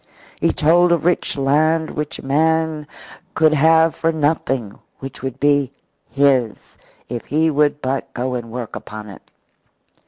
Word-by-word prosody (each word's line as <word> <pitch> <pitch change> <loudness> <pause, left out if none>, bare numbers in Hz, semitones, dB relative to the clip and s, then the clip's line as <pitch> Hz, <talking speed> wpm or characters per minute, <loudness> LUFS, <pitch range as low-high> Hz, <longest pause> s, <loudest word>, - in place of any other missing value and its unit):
He - - +2
told 170 +3 +3
of 170 -2 +1
rich 175 -4 0
land 155 +4 +1
which 150 -1 -4
a - - -11
man 160 +1 0 0.5
could 155 -1 +4
have 160 +2 +4
for 165 - 0
nothing, 145 -8 -1 0.2
which 135 -1 -9
would 135 0 -5
be 140 -2 +2 0.4
his, 135 -5 0 0.3
if 120 -1 -6
he 160 +2 +1
would 150 0 +1
but 135 +1 -3
go 125 +1 -2
and 120 -2 -5
work 120 -2 -6
upon 105 0 -9
it. 100 - -14
145 Hz, 150 wpm, -19 LUFS, 130-160 Hz, 0.5 s, could